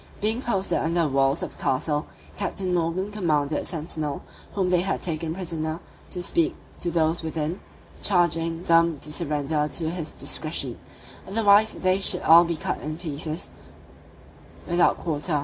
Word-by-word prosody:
Being 220 +4 +1
posted 195 -6 0
under 170 +1 +1
the 160 - +2
walls 135 +2 +2
of - - -4
the - - -13
castle, 145 +3 0 0.3
Captain 195 -2 -2
Morgan 175 +4 -1
commanded 155 -7 0
the - - -8
sentinel, 155 -3 -3 0.3
whom 185 -2 +1
they 180 -1 +4
had 195 +2 -2
taken 160 -1 -1
prisoner, 165 -3 -3 0.3
to 180 - -3
speak 335 - +1 0.2
to 175 - -1
those 165 0 +1
within, 160 +2 -3 0.4
charging 165 -3 +2
them 165 -2 +4
to 150 - -1
surrender 150 -2 0
to 160 +1 -1
his 165 -3 -5
discretion; - - 0 0.5
otherwise 210 +1 +4
they 185 +1 +1
should 195 - +4
all 170 +2 +8
be 170 0 -1
cut - - -3
in 155 +1 -5
pieces, 155 0 -4 1.1
without 175 0 +3
quarter. 155 -1 -1
165 Hz, 155 wpm, -25 LUFS, 155-185 Hz, 1.1 s, all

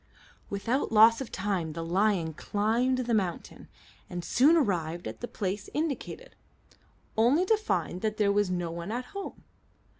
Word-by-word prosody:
Without 225 +8 -1
loss 225 +2 +6
of 265 - -6
time 185 -5 -2
the 165 +1 -5
lion 180 -2 +1
climbed 225 - 0
the 235 - 0
mountain, 190 -6 -2 0.4
and 175 -1 -5
soon 295 +7 +5
arrived 175 - -1
at - - -7
the 240 - -5
place 200 -2 -4
indicated, 320 - -3 0.8
only 255 +11 +4
to 440 - +4
find 420 - -2
that 215 -1 -1
there 205 -2 +3
was 205 -1 +2
no 175 -2 -2
one 170 +4 -5
at 245 +2 -3
home. 395 -1 -7
210 Hz, 155 wpm, -28 LUFS, 180-250 Hz, 0.8 s, loss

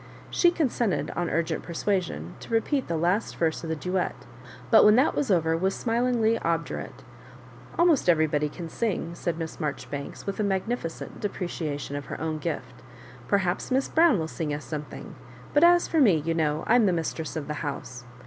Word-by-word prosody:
She 350 - +5
consent 250 - 0
ed, - - -2
on 175 -1 -1
urgent 165 0 -1
persuasion, 170 - -2
to - - -11
repeat 255 +5 +1
the 170 - -1
last 180 +7 0
verse 160 -1 0
of 165 - -5
the 160 - 0
duet, 180 +3 -1 0.6
but - - +8
when 210 0 +7
that 260 +5 +4
was 285 - -1
over 165 -4 +3
was 190 +4 0
smUing 240 +1 0
ly 225 +1 +3
obdurate. 165 0 -3 0.7
"Almost 335 - +4
everybody 155 -3 +3
can 170 +2 -7
sing," 175 -3 -2
said 170 -1 -3
Miss 165 -1 -5
Maijoribanks, 145 -1 -5
with 200 +1 -4
a - - +2
magnificent 195 -2 -3
de 205 - 0
preciation 150 -6 -4
of 145 -1 -5
her - - -6
own 160 -1 -2
gift. 125 -6 -5 0.5
"Perhaps 185 +3 0
Miss 265 +1 +1
Brown 325 -7 +5
wUl 160 -2 -2
sing 160 -2 -4
us 145 -2 -7
something; 150 +3 -7 0.4
but 290 - +4
as 345 0 +6
for 325 - +1
me^ 180 - +4
you 165 - +1
know, 155 -1 0
I'm 230 -2 +4
the 185 - +3
mistress 160 -1 -3
of 150 -3 -4
the 150 - -2
house.' 130 -3 -5
170 Hz, 190 wpm, -26 LUFS, 155-225 Hz, 0.7 s, but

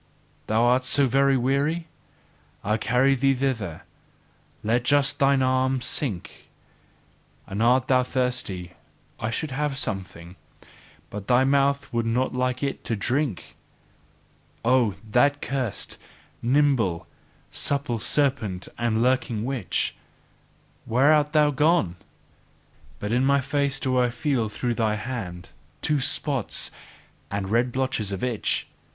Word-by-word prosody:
Thou 110 +2 +2
art 125 +2 +3
so 135 +2 +4
very 135 +1 +3
weary? 140 +6 0 0.8
I 105 +2 +1
carry 125 +4 +2
thee 135 +1 +2
thither; 115 -11 -2 0.8
let 115 +3 +2
just 145 +2 +2
thine 135 -1 +3
arm 130 0 +1
sink! 120 - -3 1.0
And 100 +3 -4
art 125 +2 +3
thou 130 -1 +4
thirsty 125 -8 -2 0.5
I 110 - -2
should 145 +6 -3
have 145 0 -2
something; 95 -5 -5 0.7
but 100 -1 -7
thy 125 +1 +4
mouth 140 0 +1
would 115 -1 0
not 125 +3 0
like 125 +1 -1
it 140 - -3
to 115 - -1
drink! 125 - -1 1.1
Oh, 120 -5 +3
that 140 +6 +3
cursed, 130 -7 -3 0.4
nimble, 120 - +2 0.5
supple 140 -5 -1
serpent 115 -9 +1
and 115 -1 +1
lurking 125 -3 0
witch! 125 -8 -1 0.9
Where 135 +6 +4
art 150 -1 +2
thou 150 -1 +4
gone? 150 - +2 1.0
But 105 +6 -4
in 125 +2 +2
my 140 +1 +4
face 140 0 -1
do 130 -2 +1
I 125 -1 +3
feel 120 -2 -1
through 120 +3 -2
thy 110 -2 0
hand, 105 -7 -6 0.3
two 150 -1 +2
spots 135 -2 0 0.6
and 100 -1 -3
red 120 +3 +2
blotches 130 -5 -1
itch! 110 +3 -1
125 Hz, 125 wpm, -25 LUFS, 110-140 Hz, 1.1 s, so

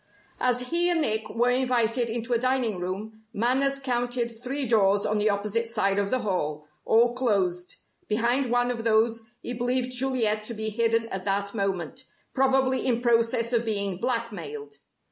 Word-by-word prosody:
As 250 0 0
he 345 +1 +3
and 340 -2 +2
Nick 220 -5 0
were 240 +2 +1
invited 245 -2 +1
into 235 +1 -3
a 235 - +2
dining 250 -6 0
room, 205 +5 -6
Manners 265 +5 +1
counted 245 -2 -1
three 270 +3 +2
doors 205 -4 +3
on 210 0 0
the 210 +1 +2
opposite 210 +3 -1
side 200 -3 0
of 200 -1 -1
the 255 +2 0
hall, 155 -8 -2 0.2
all 235 +2 +4
closed. 195 -8 0 0.3
Behind 240 +5 +1
one 245 +1 +2
of 235 -2 -4
those 225 0 +2 0.2
he 245 - -2
believed 250 +1 0
Juliet 240 -5 0
to 235 - -6
be 220 0 -2
hidden 230 +1 +1
at 190 -1 -5
that 200 0 -1
moment, 195 +3 -3 0.3
probably 265 -1 +2
in 240 -3 +1
process 230 0 +2
of 235 -1 +2
being 200 -4 0
blackmailed. 245 - -3
230 Hz, 165 wpm, -26 LUFS, 210-250 Hz, 0.3 s, all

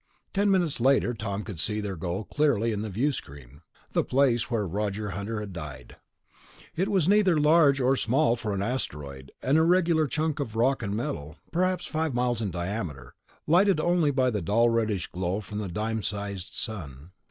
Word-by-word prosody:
Ten 205 +1 +2
minutes 175 -9 +2
later, 130 -1 +3
Tom 100 -2 -4
could 100 -7 -7
see 105 +5 -1
their 100 -2 -3
goal 90 +4 -3
clearly 120 -3 +1
in 105 -1 -2
the 110 - -4
viewscreen... 75 - -4 0.3
the - - +2
place 130 -3 +2
where 115 -4 0
Roger 105 +2 -2
Hunter 100 +4 -4
had 105 -2 -6
died. 70 -7 -8 0.8
It 185 +4 0
was 190 -6 +2
neither 195 -5 +4
large 150 -2 +5
nor 130 +1 +3
small 125 +1 +2
for 115 -3 -4
an 95 - -1
asteroid, 70 - -4
an 135 +4 +3
irregular 165 -1 +3
chunk 155 +2 -1
of 115 -6 -4
rock 130 +4 +2
and 100 -2 -2
metal, 75 -9 -4 0.2
perhaps 185 +2 0
five 155 -4 -2
miles 120 -2 0
in 105 - -1
diameter, 85 - -5 0.3
lighted 185 +2 +4
only 175 -2 +2
by 130 -2 +2
the 105 -3 -2
dull 115 +8 +3
reddish 110 -6 0
glow 90 +2 -2
from 105 0 -6
the 105 - -3
dime 110 +5 -2
sized 100 -3 -4
sun. 80 - -6
115 Hz, 180 wpm, -27 LUFS, 100-145 Hz, 0.8 s, large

